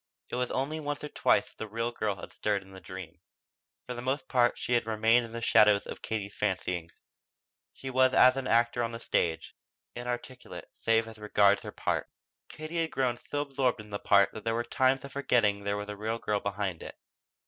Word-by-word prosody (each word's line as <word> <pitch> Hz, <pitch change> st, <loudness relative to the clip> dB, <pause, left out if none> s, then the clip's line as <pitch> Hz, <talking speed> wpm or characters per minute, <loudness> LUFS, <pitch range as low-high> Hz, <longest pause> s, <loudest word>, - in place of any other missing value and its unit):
It -, -, -2 dB
was 125 Hz, 0 st, -1 dB
only 150 Hz, +4 st, -2 dB
once 145 Hz, -1 st, -4 dB
or 150 Hz, -, -4 dB
twice -, -, +2 dB
that -, -, -25 dB
the 110 Hz, -, -4 dB
real 115 Hz, +3 st, -2 dB
girl 110 Hz, -4 st, -2 dB
had 90 Hz, -, -10 dB
stirred 105 Hz, -2 st, -1 dB
in 95 Hz, -, -17 dB
the 95 Hz, -, -10 dB
dream. 90 Hz, -2 st, -9 dB, 0.7 s
For 125 Hz, -, -5 dB
the 120 Hz, -, -6 dB
most 130 Hz, +3 st, -2 dB
part 120 Hz, -2 st, +3 dB
she 125 Hz, -, -2 dB
had 120 Hz, -2 st, +2 dB
remained 115 Hz, +2 st, +3 dB
in 115 Hz, -, -11 dB
the 115 Hz, 0 st, -5 dB
shadow 105 Hz, -2 st, +6 dB
of -, -, -8 dB
Katie's 100 Hz, -2 st, -4 dB
fancyings. 90 Hz, -4 st, -3 dB, 0.7 s
She 135 Hz, -, -7 dB
was 130 Hz, 0 st, +4 dB
as 130 Hz, 0 st, +6 dB
an 135 Hz, -1 st, -3 dB
actor 120 Hz, +1 st, +3 dB
on 115 Hz, 0 st, -2 dB
the 115 Hz, -, -5 dB
stage, 80 Hz, -7 st, -1 dB, 0.4 s
inarticulate 120 Hz, +1 st, -6 dB
save 115 Hz, 0 st, +1 dB
as 110 Hz, -1 st, -11 dB
regards 105 Hz, -1 st, +3 dB
her -, -, -7 dB
part. -, -, -2 dB, 0.4 s
Katie 155 Hz, +2 st, -4 dB
had 165 Hz, -, -1 dB
grown 125 Hz, -4 st, 0 dB
so 145 Hz, -, -3 dB
absorbed 135 Hz, -4 st, 0 dB
in 105 Hz, -1 st, -11 dB
that 100 Hz, -, -5 dB
part 100 Hz, -1 st, +5 dB
that 110 Hz, -, -8 dB
there 115 Hz, 0 st, 0 dB
were 120 Hz, -, 0 dB
times 130 Hz, +2 st, +1 dB
of 140 Hz, -, -10 dB
forgetting 115 Hz, -7 st, +2 dB
there 100 Hz, 0 st, 0 dB
was 105 Hz, 0 st, -5 dB
a 105 Hz, -, -5 dB
real 110 Hz, +3 st, -2 dB
girl 105 Hz, -2 st, -1 dB
behind 100 Hz, -4 st, -3 dB
it. -, -, -9 dB
115 Hz, 215 wpm, -29 LUFS, 105-130 Hz, 0.7 s, shadow